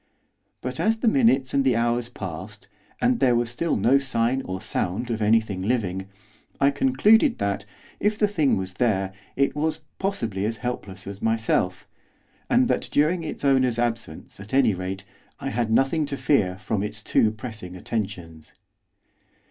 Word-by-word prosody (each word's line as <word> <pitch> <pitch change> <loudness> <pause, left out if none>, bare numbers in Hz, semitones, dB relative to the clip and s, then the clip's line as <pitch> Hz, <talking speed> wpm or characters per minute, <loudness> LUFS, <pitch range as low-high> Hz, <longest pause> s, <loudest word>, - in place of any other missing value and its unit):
But, 125 0 -4
as 225 +1 +2
the 230 - -1
minutes 220 - +3
and 140 -1 +3
the 130 -3 +3
hours 120 +1 0
passed, 95 +3 -8 0.3
and 245 0 +2
there 125 -2 +4
was 120 0 0
still 165 +7 0
no 120 +7 +4
sign 130 -1 0
or 95 0 -4
sound 100 +7 -2
of 110 -1 -2
anything 110 -3 +2
living, 95 -4 -1 0.5
I 140 0 +4
concluded 205 - +4
that, 100 0 -2 0.3
if 210 +1 +1
the 210 - +3
thing 160 -9 +2
was 95 0 -4
there, 95 -4 0 0.2
it 140 +1 +1
was, 155 +1 -1 0.2
possibly, 115 - -2
as 115 +1 -2
helpless 105 -5 -5
as 100 0 -8
myself, 110 -5 0 0.6
and 245 +1 +4
that - - -1
during 165 +4 +2
its 155 - -5
owner's 130 -4 +3
absence, 115 -10 -3
at 105 +6 -5
any 125 -6 +4
rate, 95 +1 -5 0.4
I - - -3
had 115 0 -1
nothing 135 +6 +2
to 140 -1 -4
fear 95 -13 +2
from 105 0 -2
its 105 +1 -4
too 110 - +3
pressing 110 -4 -7
attentions. 90 -6 -5
115 Hz, 165 wpm, -24 LUFS, 100-140 Hz, 0.6 s, there